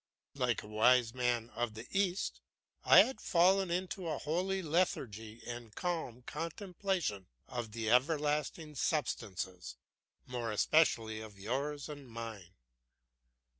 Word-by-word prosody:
Like 125 -4 0
a - - -10
wise 115 +2 +4
man 120 -2 0
of 120 -2 -2
the 110 +2 -7
East, 195 -1 0 0.4
I - - +9
had 265 - -5
fallen 185 +2 +4
into 180 +1 -2
a 160 - -1
holy 185 +5 -1
lethargy 115 - -1
and 120 -2 -7
calm 160 -9 -3
contemplation 175 - -3 0.2
of 120 -3 -5
the 110 -1 -1
everlasting 150 +3 +1
substances, 95 - -2 0.5
more 120 -2 -3
especially 110 -3 +3
of 110 -2 -10
yours 135 +8 -2
and 145 -4 -9
mine. 110 -5 -7
125 Hz, 120 wpm, -34 LUFS, 110-165 Hz, 0.5 s, I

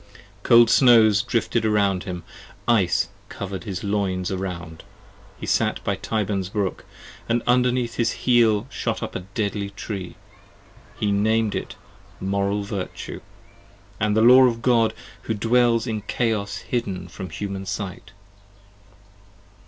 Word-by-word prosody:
Cold 120 0 +6
snows 110 -5 +6
drifted 115 -1 -1
around 100 -4 +1
him: 90 -3 -5 0.4
ice 105 -7 +2 0.2
cover'd 100 +1 -6
his 95 -4 -5
loins 95 -3 -1
around. 90 -4 -5 0.6
He - - -6
sat - - +1
by - - 0
Tyburn's 100 -4 -2
brook, 100 -2 -3 0.4
and 115 0 +1
underneath 125 -1 +1
his 115 -1 +1
heel 115 -4 +4
shot - - -3
up - - -5
15 - - -4
A - - -14
deadly 100 -2 -2
Tree: 100 -2 -6 0.8
he 105 -1 +1
nam'd 110 +1 +1
it - - -5 0.4
Moral 100 +1 -1
Virtue, 100 -2 -6 0.8
and 105 +1 +1
the 110 - +4
Law 130 +2 +8
Of 115 -2 0
God 115 -3 +3 0.3
who 110 - -1
dwells 115 +1 +2
in 110 -3 -3
Chaos 105 -1 -1
hidden 95 -7 -3
from 90 +2 -8
the 85 - -10
human 95 -1 -5
sight. 100 +1 -5
105 Hz, 135 wpm, -23 LUFS, 95-115 Hz, 0.8 s, Law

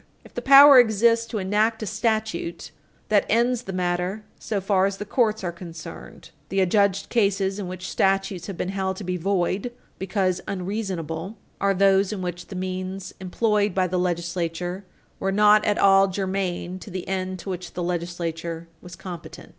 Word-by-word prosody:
If - - -16
the - - -4
power 275 0 +9
exists 230 0 +3
to 230 - -4
enact 215 +3 +1
a - - -2
statute, 215 -4 -2 0.4
that 205 -2 +4
ends 240 +2 +2
the 195 - -7
matter 180 +3 -2 0.2
so 210 - -2
far 195 0 +2
as 195 0 -4
the 210 - -5
courts 220 -2 +1
are 175 - -1
concerned. 170 -1 -10 0.2
The 195 - 0
adjudged 200 +1 +2
cases 195 -3 +1
in 195 - -4
which 185 +1 -6
statutes 195 -2 0
have 195 -4 -6
been 180 - -2
held 190 -1 -2
to 205 - -6
be 180 0 -2
void 190 +4 -1 0.3
because 185 -1 0
unreasonable 185 -2 -4 0.2
are 200 0 +2
those 195 +1 +3
in 195 -3 -4
which 175 0 -5
the 195 - -8
means 185 +1 -4
employed 205 +1 0
by 185 -1 +2
the 180 0 -1
legislature 175 +1 -2 0.3
were 195 - -1
not 210 +1 +5
at 205 - +1
all 195 0 +5
germane 185 -1 -3
to - - -10
the 185 -1 -6
end 185 -1 -2
to 190 +2 -6
which 180 -1 -6
the 180 - -3
legislature 170 -1 -4
was 180 0 -11
competent. 180 -3 -9
190 Hz, 175 wpm, -24 LUFS, 180-205 Hz, 0.4 s, power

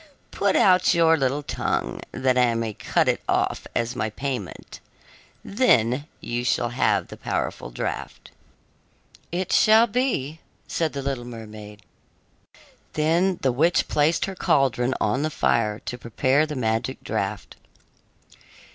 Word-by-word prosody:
Put 200 -1 +1
out 185 -2 +4
your 165 -1 +5
little 140 0 -1
tongue, - - -2
that 130 -1 +1
I 125 -2 +3
may 115 -1 -2
cut - - 0
it - - +1
off - - 0
as 120 +2 -1
my 110 -3 -1
payment; 125 -4 -6 0.7
then 145 - +2
you 120 +1 -3
shall 120 -1 +1
have 125 +2 +1
the - - -9
powerful - - -3
draft." - - -5 1.0
"It 180 +2 -2
shall 220 +2 +6
be," 205 - -1 0.3
said 160 -2 -1
the 140 -1 -4
little 135 -3 -3
mermaid. 105 -3 -10 1.1
Then 170 +4 +2
the 130 - +3
witch 160 +8 +2
placed 155 +2 +2
her 195 - -5
caldron 130 -7 +1
on 110 +6 0
the 155 - 0
fire, 110 -7 +1
to 125 - -5
prepare 130 +6 +1
the 150 - -5
magic 115 +1 -2
draft. 105 -2 -4
130 Hz, 135 wpm, -24 LUFS, 115-160 Hz, 1.1 s, shall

